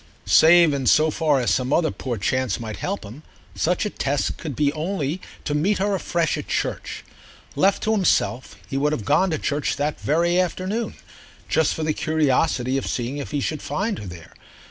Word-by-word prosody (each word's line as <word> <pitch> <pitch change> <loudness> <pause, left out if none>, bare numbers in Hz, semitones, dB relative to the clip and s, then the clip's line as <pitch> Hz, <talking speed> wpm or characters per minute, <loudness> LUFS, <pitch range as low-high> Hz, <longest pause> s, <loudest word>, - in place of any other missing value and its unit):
Save 170 -1 +6
in 135 -3 -2
so 155 0 +4
far 150 -3 +2
as 125 - +1
some 130 0 0
other 160 0 +2
poor 125 -3 -4
chance 130 +2 0
might 110 -2 -6
help 200 - -3
him, 110 +8 -10 0.3
such 180 +5 0
a 210 - -2
test 140 0 -1
could 150 -5 -6
be 145 +1 +1
only 160 0 -2 0.2
to 145 - -1
meet 180 +8 +1
her 200 +1 0
afresh 170 -3 0
at - - -7
church. - - -3 0.5
Left 195 +1 +2
to 220 - +1
himself 175 - +1
he 135 - -3
would 150 +2 +1
have 115 -9 -4
gone 190 - +3
to 160 - -1
church 145 0 -1
the 150 +1 -1
very 170 +4 +1
next 185 - +5
afternoon, 185 +6 -3 0.5
just 160 -2 +2
for 160 - -3
the 155 0 +1
curiosity 145 -4 +1
of - - -6
seeing 125 +3 -3
if 140 - -5
he 145 - -2
should 155 +2 -2
find 205 0 -2
her 100 - -8
there. 85 -2 -11
155 Hz, 200 wpm, -23 LUFS, 135-175 Hz, 0.5 s, Save